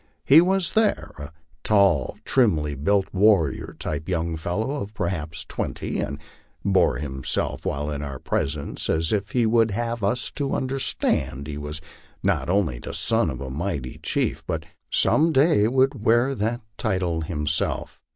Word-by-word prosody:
He 150 +4 +8
was 185 0 +1
there, 220 -1 +1
a 70 +3 -7 0.3
tall, 100 - +3
trimly 80 - +2
built, 95 +8 +1
warrior 95 -8 +2
like 75 +3 -3
young 85 -2 -1
fellow 110 - -2
of 105 +2 -7
perhaps 80 -4 -3
twenty, - - -4
and - - -3 0.5
bore 95 -9 +3
himself 65 -2 -1
while 75 +2 -2
in 70 -1 -4
our 70 -2 -5
presence 70 +2 -2
as 80 +4 +1
if 100 -1 -2
he 120 -2 +3
would 115 0 +3
have 115 +1 -3
us 110 +4 +1
to 140 -2 -2
understand 130 - 0
he 75 0 -5
was 75 +1 -5 0.4
not - - 0
only 90 -11 +1
the - - -5
son - - +2
of - - -6
a 65 -1 -5
mighty 75 -4 -4
chief, - - -1
but - - -3 0.2
some 165 +2 +3
day 135 -7 +4
would 130 -1 +1
wear 120 +4 +3
that 120 +1 -2 0.2
title 90 -6 -1
himself. 80 -1 -1
95 Hz, 155 wpm, -24 LUFS, 75-120 Hz, 0.5 s, He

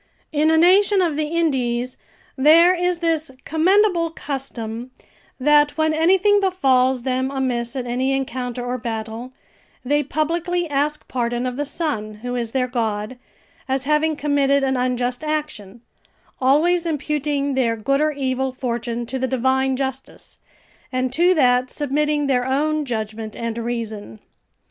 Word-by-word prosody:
In 305 0 +2
a 320 - +4
nation 385 +4 +5
of 340 -5 +1
the 305 0 -1
Indies, 255 -7 -1 0.4
there 325 +6 +6
is 355 -1 -1
this 325 -2 0 0.2
commendable 350 +1 +3
custom, 255 -6 -6 0.5
that 295 +2 +3
when 315 0 +2
anything 380 +6 +4
befalls 265 -10 +2
them 260 0 -1
amiss 250 -3 -2
in 255 -2 -3
any 255 +2 -1
encounter 250 -2 -3
or 250 +1 -3
battle, 225 +1 -5 0.5
they 290 +3 +2
publicly 335 +4 -1
ask 295 +1 -1
pardon 240 -1 -2
of 250 -1 -3
the 290 +2 -2
sun, 275 -9 -3
who 245 0 -3
is 235 -2 -2
their 255 0 0
god, 225 -1 -3 0.5
as 265 0 0
having 300 +2 +1
committed 280 -1 +1
an 265 0 +1
unjust 250 +1 -1
action, 295 -9 -4 0.6
always 325 +7 +3
imputing 295 -2 -1
their 245 -4 +1
good 275 +6 0
or 305 0 +2
evil 265 -2 -2
fortune 240 -2 -3
to 265 +3 -4
the 260 - 0
divine 265 +1 +1
justice, 265 0 -6 0.5
and 255 0 -1
to 350 +5 +4
that 250 -3 +3
submitting 295 +1 0
their 255 -2 +1
own 300 +3 0
judgment 220 -2 -4
and 230 -1 -4
reason. 220 - -5
270 Hz, 145 wpm, -21 LUFS, 245-310 Hz, 0.6 s, there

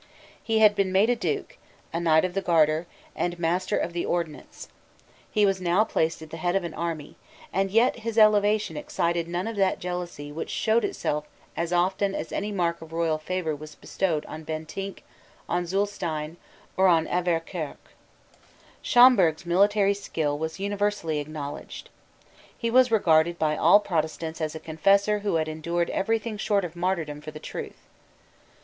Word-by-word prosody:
He 225 -1 0
had 215 -1 +6
been 195 -2 +1
made 200 +5 +4
a - - +2
Duke, - - -3 0.3
a 170 - -1
Knight 160 0 +4
of 180 - -3
the 195 - -1
Garter, 160 -2 +2 0.3
and 175 0 -2
Master 175 +2 0
of 170 - -2
the 170 - -2
Ordnance: 170 -3 -4 0.6
he 210 -2 +3
was 195 -1 +1
now 180 +4 +3
placed 160 -7 -1
at 155 - -12
the 165 - -6
head 175 +2 -1
of 195 - +1
an 170 -2 -5
army: 165 -3 -5 0.4
and 195 +1 +1
yet 230 +6 +3
his 230 0 -4
elevation 210 -1 +4
excited 170 - -1
none 175 +2 -2
of 225 - -4
that 195 -1 +2
jealousy 175 -5 -5
which 160 +2 -5
showed 225 +1 +1
itself 150 -5 -2 0.3
as 170 0 -2
often 190 +3 +1
as - - -5
any 210 +1 -2
mark 170 -4 -1
of 160 0 -11
royal 165 -1 0
favour 160 -1 -2
was 150 +1 -11
bestowed 165 -6 -2
on 155 +1 -8
Bentinck, 160 +5 -6 0.4
on 175 0 -1
Zulestein, 170 -5 -2 0.4
or 190 0 +5
on 165 -3 +3
Auverquerque. 170 -2 -2 0.9
Schomberg's 210 -11 +5
military 200 +3 +3
skill 160 -7 -2
was 160 +2 -4
universally 200 -5 -1
acknowledged. 145 -1 -7 0.7
He 230 -1 -2
was 255 +1 +5
regarded 170 -6 +3
by 155 -2 +1
all 170 +7 +6
Protestants 160 -3 -3
as 155 0 -2
a - - -5
confessor 195 +7 +2
who 200 -3 -1
had 160 -1 +1
endured 170 +2 -2
every 225 +4 +1
thing 220 -1 -6
short 205 -2 +1
of 170 -1 -8
martyrdom 170 -5 -2
for 155 - -8
the 155 0 -9
truth. - - -7
175 Hz, 170 wpm, -26 LUFS, 160-200 Hz, 0.9 s, had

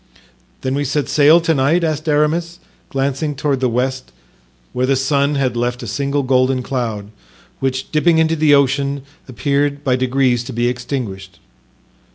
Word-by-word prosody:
"Then 130 0 -2
we 145 +1 0
set 145 +1 -1
sail 155 +3 +5
to 165 0 +1
night?" 150 +5 +2
asked 155 -1 -1
Aramis, 160 +3 0 0.3
glancing 140 +2 -2
toward 140 -1 -1
the 130 -1 +1
west, 130 +2 -2 0.6
where 125 +1 0
the 135 - +3
sun 140 +2 +1
had 130 -3 0
left 120 +1 -2
a - - -6
single 140 +6 -1
golden 130 0 +1
cloud, 115 -6 -4 0.5
which, 130 0 -2
dipping 160 +2 +3
into 160 0 +2
the 150 -2 +4
ocean, 140 0 +1 0.3
appeared 140 +2 -1
by 130 -3 +2
degrees 130 -1 +1
to 130 - -7
be 120 +1 0
extinguished. 120 -7 -5
135 Hz, 160 wpm, -18 LUFS, 125-145 Hz, 0.6 s, sail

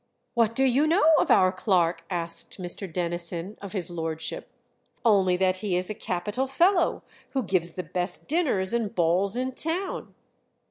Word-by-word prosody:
"What 230 -1 +2
do 265 - +2
you 270 +4 +3
know 325 -1 +4
of - - +1
our 185 0 +5
clerk?" 175 -4 +1
asked 170 +1 -2
Mr. 180 +1 -2
Denison 175 +2 -3
of 200 -1 -8
his 180 -3 -1
lordship. 160 -2 -4 0.6
"Only 190 -5 +4
that 185 0 +1
he 185 -2 -1
is 180 +3 0
a - - -2
capital 210 +8 -3
fellow, 345 +6 +2 0.3
who 265 -2 0
gives 175 -4 +1
the 185 - -4
best 180 +1 -2
dinners 265 - +1
and 230 -4 -1
balls 180 +5 +1
in 255 +1 -1
town." 335 +8 -3
190 Hz, 165 wpm, -26 LUFS, 175-250 Hz, 0.6 s, our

